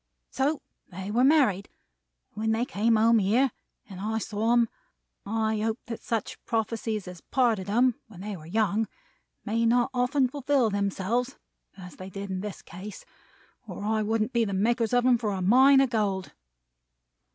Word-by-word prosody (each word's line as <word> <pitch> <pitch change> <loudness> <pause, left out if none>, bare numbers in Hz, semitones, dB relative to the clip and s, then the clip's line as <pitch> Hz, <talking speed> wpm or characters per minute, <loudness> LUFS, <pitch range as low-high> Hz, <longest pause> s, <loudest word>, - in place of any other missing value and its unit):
So 280 +4 0 0.3
they 190 +2 -6
were 240 +4 +2
married; 260 - +3 0.6
and - - -31
when 220 0 +1
they 230 +2 0
came 230 -3 +1
home 225 +1 +5
here, 225 +7 +2 0.4
and 190 -3 -10
I 220 +3 -2
saw 220 0 -2
them, 240 -1 +4 0.6
I 220 0 0
hoped 220 +1 -2
that 230 -1 -6
such 225 -3 -3
prophecies 225 -2 -2
as 180 -2 -9
parted 230 -7 +1
them 240 +5 +3
when 195 -5 -12
they 205 0 -5
were 155 -3 -11
young, 215 +3 +1 0.6
may 230 +2 0
not 240 +2 +3
often 255 +2 +2
fulfill 270 -3 +1
themselves 200 +6 -1 0.4
as 180 -2 -11
they 185 +1 -8
did 195 +1 -6
in 185 - -2
this 205 -3 -7
case, 190 +4 -10 0.6
or 190 0 -7
I 220 0 +1
wouldn't 220 +2 0
be 235 -1 +3
the 200 -3 -2
makers 230 +3 +1
of 245 0 +3
them 250 -2 +4
for 215 -3 -1
a 190 - -3
Mine 265 +7 +6
of 265 -2 +1
Gold." 200 -5 -1
220 Hz, 175 wpm, -27 LUFS, 200-240 Hz, 0.6 s, Mine